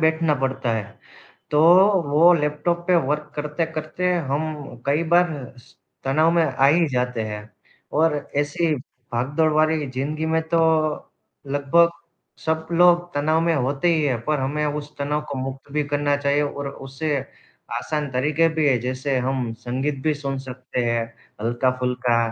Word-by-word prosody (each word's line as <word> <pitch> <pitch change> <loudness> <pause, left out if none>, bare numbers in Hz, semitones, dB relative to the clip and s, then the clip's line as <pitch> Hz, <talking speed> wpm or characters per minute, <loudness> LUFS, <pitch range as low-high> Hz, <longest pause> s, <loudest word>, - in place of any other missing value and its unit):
बैठना 160 -1 +2
पड़ता 130 -2 -1
है। 110 - -1 0.7
तो 150 - +3 0.5
वो 165 +5 +6
लैपटॉप 150 +2 0
पे 180 - +5
वर्क 150 +1 -2
करते-करते 160 +3 -2 0.2
हम 145 -3 -3
कई 145 +3 +2
बार 175 0 +5 0.3
स 120 - -19 0.3
तनाव 155 +5 +3
में 170 - +3
आ 135 -2 +2
ही 165 +3 +4
जाते 125 -3 -1
हैं 105 -1 -5 0.6
और 160 -1 +4 0.2
ऐसे 145 +3 0
ही 155 - +2 0.4
भागदौड़ 145 +7 +1
भरी 155 -1 +2
ज़िंदगी 150 +5 -3
में 160 0 +1
तो 170 0 +2 0.9
लगभग 145 +5 +3 0.6
सब 160 0 0
लोग 175 0 +5
तनाव 155 +3 +2
में 165 0 +2
होते 140 +3 0
ही 155 - +1
हैं। 130 -5 0
पर 150 -2 0
हमें 145 +3 -1
उस 150 0 -4
तनाव 145 +1 -1
को 140 - -4
मुक्त 135 +1 -6
भी 150 0 0
करना 145 0 +1
चाहिए 145 +1 +1
और 145 -1 -3
उससे 140 +2 -3 0.6
आसान 150 -2 -3
तरीक़े 150 +6 +2
भी 160 -2 0
हैं, 130 -3 +3
जैसे 130 +2 -2
हम 125 -2 -1
संगीत 135 +4 -2
भी 155 -1 +1
सुन 140 -2 -4
सकते 130 -1 -5
हैं 115 -1 0 0.4
हल्का-फुल्का 125 +1 0
145 Hz, 155 wpm, -23 LUFS, 130-160 Hz, 0.9 s, वो